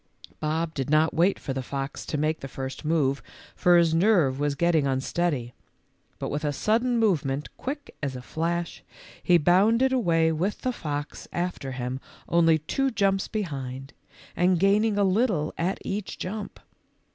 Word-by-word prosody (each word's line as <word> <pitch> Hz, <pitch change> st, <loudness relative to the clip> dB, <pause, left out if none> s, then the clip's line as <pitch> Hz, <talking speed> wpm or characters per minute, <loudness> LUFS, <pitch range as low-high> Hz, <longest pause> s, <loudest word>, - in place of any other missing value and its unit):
Bob 160 Hz, +1 st, -1 dB
did 135 Hz, -3 st, -3 dB
not 155 Hz, +1 st, +3 dB
wait 180 Hz, +4 st, +3 dB
for 135 Hz, -, -4 dB
the 130 Hz, -, -2 dB
fox 135 Hz, +1 st, -5 dB
to 150 Hz, -, -2 dB
make 155 Hz, +2 st, 0 dB
the 135 Hz, -, -6 dB
first 135 Hz, +1 st, -6 dB
move, 150 Hz, -3 st, +1 dB, 0.3 s
for 175 Hz, 0 st, +5 dB
his 170 Hz, -2 st, +4 dB
nerve 165 Hz, -7 st, +3 dB
was 145 Hz, -1 st, 0 dB
2'ettino; 160 Hz, -4 st, +2 dB
unsteady, 130 Hz, -2 st, -1 dB, 0.6 s
but -, -, -4 dB
with 145 Hz, +2 st, -2 dB
a 145 Hz, -, +1 dB
sudden 235 Hz, -, +1 dB
movement 150 Hz, -10 st, 0 dB
quick 285 Hz, +2 st, -6 dB
as 140 Hz, -3 st, -2 dB
a 125 Hz, -, -6 dB
flash 170 Hz, +4 st, -3 dB, 0.4 s
he 175 Hz, -, +5 dB
bounded 215 Hz, -, +4 dB
away 165 Hz, -9 st, +3 dB
with 180 Hz, +6 st, -2 dB
the 255 Hz, -, -1 dB
fox 145 Hz, -6 st, -5 dB
after 175 Hz, -6 st, -3 dB
him 130 Hz, 0 st, -4 dB, 0.3 s
only 165 Hz, -2 st, +4 dB
two 270 Hz, -, -1 dB
jumps 195 Hz, -4 st, +1 dB
behind 135 Hz, -, -5 dB, 0.4 s
and 180 Hz, 0 st, +3 dB
gaining 205 Hz, +3 st, +3 dB
a 205 Hz, -, +3 dB
little 190 Hz, -6 st, +1 dB
at 180 Hz, +3 st, -1 dB
each 200 Hz, 0 st, -4 dB
jump. 205 Hz, +3 st, -5 dB
165 Hz, 160 wpm, -26 LUFS, 145-195 Hz, 0.6 s, for